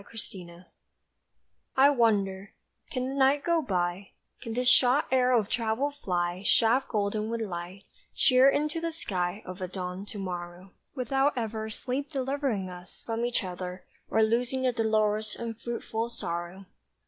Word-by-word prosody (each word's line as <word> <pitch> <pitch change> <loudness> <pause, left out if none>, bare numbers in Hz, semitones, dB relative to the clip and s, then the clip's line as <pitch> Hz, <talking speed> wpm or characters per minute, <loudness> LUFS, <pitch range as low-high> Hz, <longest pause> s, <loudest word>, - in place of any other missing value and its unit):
EXCURSION 180 -5 -9 1.1
I 275 +2 +7
WONDER, 205 -6 +1 0.4
can 255 -2 -2
the 265 - -3
night 275 +1 +3
go 340 -1 +2
by; 180 - -2 0.3
Can 230 -3 -5
this 250 0 +1
shot 255 +3 +5
arrow 255 -1 +4
of 210 - -3
travel 230 +6 0
fly 180 -9 -2
Shaft 230 +5 +3
golden 210 0 -1
with 230 0 -2
light, 180 -1 -5 0.3
sheer 255 0 +6
into 300 +3 0
the 335 0 -1
sky 190 - -3
Of 185 +1 -8
a 185 - -2
dawned 185 +1 -5
to 210 - -6
morrow, 180 -1 -6 0.2
Without 270 +2 +1
ever 220 -1 -3
sleep 260 +5 -3
delivering 270 -7 -1
us 180 0 -11
From 230 0 -2
each 240 -2 0
other, 180 0 -6 0.2
or 220 - +3
loosing 245 +4 +1
the 255 - +3
dolorous 215 -1 +1
Unfruitful 230 0 -4
sorrow! 180 -3 -5
220 Hz, 150 wpm, -28 LUFS, 185-255 Hz, 1.1 s, I